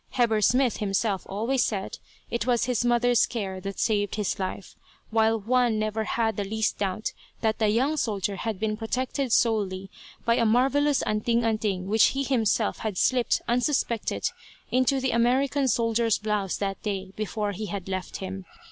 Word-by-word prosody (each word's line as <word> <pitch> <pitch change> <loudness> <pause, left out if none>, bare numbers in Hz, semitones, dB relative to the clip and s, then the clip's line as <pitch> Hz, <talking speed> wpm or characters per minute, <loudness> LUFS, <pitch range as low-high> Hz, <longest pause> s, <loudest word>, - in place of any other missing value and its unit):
Heber 225 -4 +2
Smith 250 +3 +3
himself 195 -1 -1
always 230 +6 0
said 195 -3 -3 0.3
it 235 0 -2
was 240 -2 +2
his 245 -2 0
mother's 240 -1 +3
care 195 -5 -4
that 195 0 -5
saved 205 -3 0
his 210 -3 -2
life, 190 0 -5 0.4
while 225 0 +3
Juan 240 +1 +2
never 215 0 -1
had 220 -1 0
the 205 - 0
least 220 +2 -1
doubt 200 +2 -2 0.3
that 220 -1 0
the 220 - +3
young 265 +8 +1
soldier 200 -6 -1
had 220 -2 -3
been 215 0 -1
protected 255 +3 -2
solely 195 -5 +1 0.3
by 235 0 +3
a - - +3
marvellous 270 +5 +3
"anting 230 +2 +1
anting" 215 -5 0
which 215 +3 +4
he 275 - +1
himself 225 -5 +1
had 215 -4 -3
slipped 250 +3 +2
unsuspected 240 -2 0 0.4
into 255 +2 +2
the 260 -1 0
American 265 +4 +2
soldier's 230 -2 +2
blouse 210 -3 -1
that 195 -1 -3
day, 195 -2 -3
before 210 -1 -2
he 210 +2 -5
had 200 -3 -5
left 185 -1 -4
him. 190 0 -6
220 Hz, 165 wpm, -26 LUFS, 205-240 Hz, 0.4 s, which